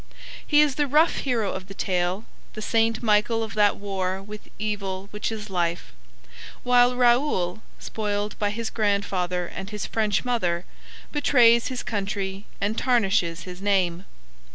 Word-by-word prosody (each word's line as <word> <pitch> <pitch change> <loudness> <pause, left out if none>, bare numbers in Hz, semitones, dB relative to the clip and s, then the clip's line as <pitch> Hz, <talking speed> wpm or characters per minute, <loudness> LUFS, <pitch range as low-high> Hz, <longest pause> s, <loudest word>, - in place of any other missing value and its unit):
He 295 -1 +5
is 295 -3 +2
the 290 - +2
rough 305 +5 +3
hero 230 -7 -1
of 190 0 -6
the 195 - -10
tale, 185 +2 -1 0.3
the 215 - -7
Saint 225 +1 +1
Michael 220 +1 +2
of 220 - -6
that 210 -1 +3
war 190 -2 -2
with 210 +2 -10
evil 195 -2 -3
which 210 +1 -3
is 215 -1 -6
life; 170 -2 -2 0.7
while 245 0 +4
Raoul, 240 -7 +2 0.2
spoiled 210 -1 -3
by 205 - +1
his 225 +2 -4
grandfather 195 -4 0
and 190 +3 -7
his 210 -1 -4
French 215 0 0
mother, 180 -8 0 0.5
betrays 240 -5 +4
his 255 -1 -4
country 195 -1 -3
and 210 +3 -1
tarnishes 195 -9 +1
his 180 0 -9
name. 190 -3 +1
210 Hz, 150 wpm, -25 LUFS, 190-230 Hz, 0.7 s, He